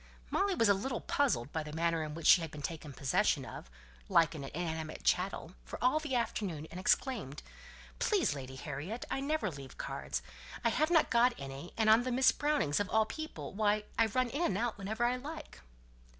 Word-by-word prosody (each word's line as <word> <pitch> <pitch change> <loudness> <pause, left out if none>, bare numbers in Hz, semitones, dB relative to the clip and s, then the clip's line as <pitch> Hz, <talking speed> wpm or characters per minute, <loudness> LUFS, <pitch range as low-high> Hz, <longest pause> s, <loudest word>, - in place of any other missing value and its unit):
Molly 390 -1 +2
was 230 - +3
a 200 - +6
little 230 +5 -3
puzzled 240 - 0
by 160 - -2
the 150 0 -7
manner 165 0 +1
in 150 -1 -5
which 165 - -7
she 180 - +8
had 165 - -4
been 150 -1 -9
taken 155 -1 -5
possession 135 -1 +1
of, - - -9 0.4
like 165 0 +4
an 150 -3 -6
inanimate 160 0 -4
chattel, 180 -2 0
for - - -7
all 255 +5 +3
the 300 -4 -3
afternoon, 195 -9 -2
and 180 - -6
exclaimed, 195 - 0 0.6
"Please, - - +2
Lady 130 -2 -7
Harriet 150 - -5
I - - 0
never 280 - -1
leave 135 -3 -10
cards; - - -4 0.4
I - - +5
have 310 +7 +1
not 335 -2 +4
got 240 +1 +4
any, 135 +4 -7
and 220 -1 +2
on 220 +2 +7
the 255 +1 -2
Miss 255 +2 +5
Brownings, 290 - +1
of 205 - -1
all 220 0 +3
people; 315 +2 -6
why, 210 +1 +2
I 230 - +4
am 220 +2 -4
in 285 +7 -3
and 200 - +1
out 235 +1 -1
whenever 220 +4 -2
I 245 +1 +1
like." 310 - -8
205 Hz, 205 wpm, -33 LUFS, 155-250 Hz, 0.6 s, she